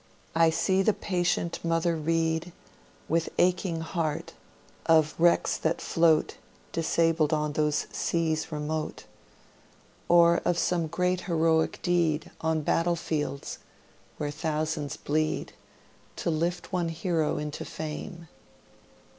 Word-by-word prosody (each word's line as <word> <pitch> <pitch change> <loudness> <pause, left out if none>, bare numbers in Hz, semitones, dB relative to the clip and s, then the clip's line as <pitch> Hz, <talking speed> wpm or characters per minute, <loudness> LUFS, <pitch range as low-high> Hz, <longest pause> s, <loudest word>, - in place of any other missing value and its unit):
I 165 0 +5
see 190 +4 +2
the 215 +2 +3
patient 175 -2 -1
mother 165 0 +1
read, 165 +1 0 0.5
With 165 +1 +1
aching 175 -2 +1
heart, 160 -2 -3 0.5
of 160 -2 +4
wrecks 170 +1 +3
that 160 +1 0
float 165 -2 +2 0.3
Disabled 165 -1 +2
on 150 -1 0
those 150 0 +1
seas 160 -1 -1
remote, 155 +1 -3 1.1
Or 170 0 +6
of 175 -1 +1
some 170 -2 +1
great 180 +2 0
heroic 160 -1 +2
deed 165 -4 +1
On 160 -1 +1
battle 170 +3 +1
fields, 145 -4 -3 0.6
where 145 -1 -2
thousands 155 -1 -2
bleed 155 +1 -1 0.6
To 170 - -1
lift 170 +3 -2
one 175 -2 0
hero 165 -2 0
into 150 0 -4
fame. 160 +2 -6
165 Hz, 115 wpm, -28 LUFS, 155-170 Hz, 1.1 s, Or